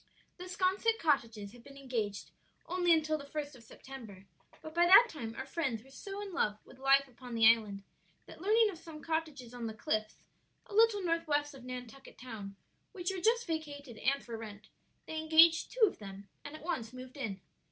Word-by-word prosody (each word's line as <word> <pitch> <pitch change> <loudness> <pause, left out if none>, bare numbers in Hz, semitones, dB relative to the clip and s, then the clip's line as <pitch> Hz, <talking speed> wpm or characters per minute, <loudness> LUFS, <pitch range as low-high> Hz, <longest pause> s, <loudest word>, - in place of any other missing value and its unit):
The 360 - -6
'Sconset 385 +5 +1
cottages 230 - 0
had 240 0 -15
been 275 +2 -13
engaged 230 -7 -3 0.3
only 355 0 +1
until 310 -1 +3
the 280 - -10
first 290 -1 -5
of 245 - -14
September, 220 -5 -11 0.4
but 315 - -8
by 345 +1 +4
that 435 +7 +9
time 230 -7 -6
our 265 - -5
friends 265 -6 -2
were 270 - -18
so 390 +8 -7
in 395 -2 -8
love 210 -11 0
with 260 - -16
life 275 +1 +4
upon 250 -1 -9
the 225 -1 +6
island 215 -4 +3 0.4
that - - -13
learning 430 +2 +4
of 340 - -11
some 325 -2 -11
cottages 310 -7 -3
on 240 -2 -4
the 220 - -6
cliffs, 215 0 -1 0.5
a - - -13
little 435 -2 +4
north 335 -1 0
west 290 -1 0
of 265 -2 -12
Nantucket 255 +1 -9
Town, 210 -6 -8 0.4
which 360 -2 -2
were 370 - -4
just 470 +3 +3
vacated 290 -7 -5
and 275 +5 0
for 235 - -6
rent, 215 -1 -10 0.4
they 315 - -4
engaged 320 +1 +6
two - - +5
of 395 - -3
them 200 -1 -9 0.2
and 290 +1 -8
at 310 - -11
once 240 -9 -3
moved 255 0 -10
in. 225 -9 -4
275 Hz, 200 wpm, -33 LUFS, 230-335 Hz, 0.5 s, that